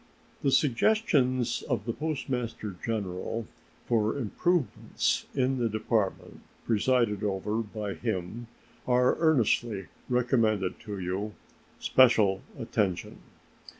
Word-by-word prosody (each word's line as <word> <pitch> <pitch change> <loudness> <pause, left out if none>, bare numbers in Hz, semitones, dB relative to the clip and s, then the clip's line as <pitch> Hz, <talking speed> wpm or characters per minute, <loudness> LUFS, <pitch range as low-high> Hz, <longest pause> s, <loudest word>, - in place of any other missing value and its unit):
The 140 - +2
suggestions 130 - +2
of 115 -6 -1
the 115 - -1
Postmaster 125 - -3
General 110 +1 -3 0.4
for 110 +1 +1
improvements 150 - 0
in 130 0 +1
the 115 -2 +1
Department 110 -2 -1 0.2
presided 115 -2 +2
over 105 +1 -1
by 105 -2 -3
him 110 +1 -4 0.4
are 125 0 +4
earnestly 120 - +2 0.2
recommended 115 -6 +1
to 105 -1 -4
you, 95 +3 -3 0.4
special 110 -7 +4 0.2
attention. 95 -4 -2
115 Hz, 95 wpm, -28 LUFS, 105-125 Hz, 0.4 s, are